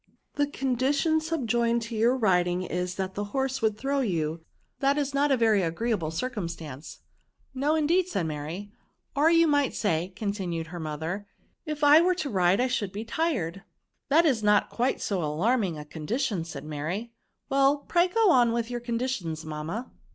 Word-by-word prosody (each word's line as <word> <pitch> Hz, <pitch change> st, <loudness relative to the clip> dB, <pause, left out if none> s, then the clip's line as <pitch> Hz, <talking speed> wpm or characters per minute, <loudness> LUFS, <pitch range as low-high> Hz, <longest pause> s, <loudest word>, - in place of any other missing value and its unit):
The 290 Hz, 0 st, +1 dB
condition 280 Hz, +4 st, +1 dB
subjoined 235 Hz, -7 st, 0 dB
to 230 Hz, 0 st, -6 dB
your 235 Hz, +4 st, +3 dB
riding 180 Hz, -5 st, +2 dB
is, 180 Hz, 0 st, -3 dB
that 190 Hz, 0 st, -3 dB
the 205 Hz, -, -3 dB
horse 265 Hz, -1 st, 0 dB
would 215 Hz, -2 st, +1 dB
throw 275 Hz, +4 st, -1 dB
you; 165 Hz, -, -1 dB, 0.4 s
that 275 Hz, +1 st, +2 dB
is 285 Hz, -1 st, -1 dB
not 285 Hz, +1 st, +2 dB
a 270 Hz, -, +4 dB
very 220 Hz, -4 st, +3 dB
agreeable 175 Hz, 0 st, -1 dB
circumstance." 165 Hz, -, -5 dB, 0.3 s
'* -, -, -41 dB
No, 285 Hz, +4 st, +1 dB
indeed," 335 Hz, +4 st, +2 dB
said 195 Hz, -, -1 dB
Mary. 160 Hz, +7 st, -5 dB, 0.2 s
" -, -, -46 dB
Or 295 Hz, +3 st, +4 dB
you 335 Hz, 0 st, +5 dB
might 290 Hz, -4 st, +2 dB
say," 175 Hz, -3 st, 0 dB
continued 190 Hz, -6 st, -3 dB
her 175 Hz, +2 st, -8 dB
mother, 160 Hz, +6 st, -4 dB, 0.4 s
If 305 Hz, -1 st, -4 dB
I 295 Hz, +2 st, +8 dB
were 365 Hz, +1 st, +3 dB
to 305 Hz, -6 st, -3 dB
ride, 185 Hz, -1 st, +3 dB
I 250 Hz, -, +3 dB
should 230 Hz, -6 st, -1 dB
be 210 Hz, +3 st, -5 dB
tired." 225 Hz, -, -1 dB, 0.5 s
^^That 320 Hz, +4 st, +5 dB
is 260 Hz, -8 st, +2 dB
not 210 Hz, -1 st, +3 dB
quite 250 Hz, +3 st, 0 dB
so 190 Hz, -5 st, -1 dB
alarming 180 Hz, +4 st, 0 dB
a 150 Hz, -, -7 dB
con 150 Hz, 0 st, -9 dB
dition," 220 Hz, -, -1 dB
said 140 Hz, -4 st, -7 dB
Mary; 160 Hz, +10 st, -4 dB, 0.4 s
well, 275 Hz, +1 st, +4 dB
pray 350 Hz, 0 st, +3 dB
go 440 Hz, +1 st, +3 dB
on 240 Hz, -4 st, +4 dB
with 235 Hz, 0 st, -2 dB
your 240 Hz, -, -2 dB
conditions, 230 Hz, -10 st, -3 dB
mamma." 155 Hz, +10 st, -5 dB
225 Hz, 180 wpm, -27 LUFS, 175-275 Hz, 0.5 s, I